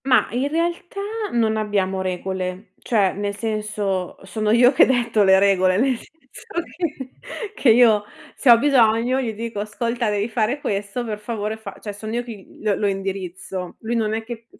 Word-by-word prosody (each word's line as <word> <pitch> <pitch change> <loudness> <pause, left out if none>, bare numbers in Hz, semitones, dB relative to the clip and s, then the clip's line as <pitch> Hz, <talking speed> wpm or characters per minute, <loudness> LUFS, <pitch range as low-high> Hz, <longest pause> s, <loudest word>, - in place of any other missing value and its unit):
Mah, 260 -2 +4
in 255 +4 0
realtà 340 +4 -2 0.3
non 220 -2 +1
abbiamo 195 -3 0
regole. 185 +1 -4
Cioè, 205 -5 +1
nel 200 0 -3
senso, 210 -4 -2
sono 215 +2 -2
io 240 +3 +6
che - - +6
detto 235 -4 +2
le 190 -1 +6
regole, 190 -1 +3
nel 260 +3 +2
senso 275 +3 -15
che 310 -7 -5 0.4
che 275 - +2
io 225 -2 +6 0.3
se 270 - +1
ho 235 - +10
bisogno 245 -1 +3
gli 230 -4 -2
dico: 225 0 -5
"Ascolta 230 +3 -2
devi 205 0 0
fare 235 +4 0
questo, 205 0 -3
per 210 -2 -4
favore 215 0 -4
fa" 220 - -9
cioè 205 - -6
son 215 +2 -7
io 240 +1 -1
che 240 -1 -7
gl - - -18
lo 210 -2 +2
lo 205 - 0
indirizzo. 190 -2 -4
Lui 230 +2 -2
non 220 -2 0
è 225 - -3
che 230 0 -9
220 Hz, 180 wpm, -22 LUFS, 200-240 Hz, 0.4 s, ho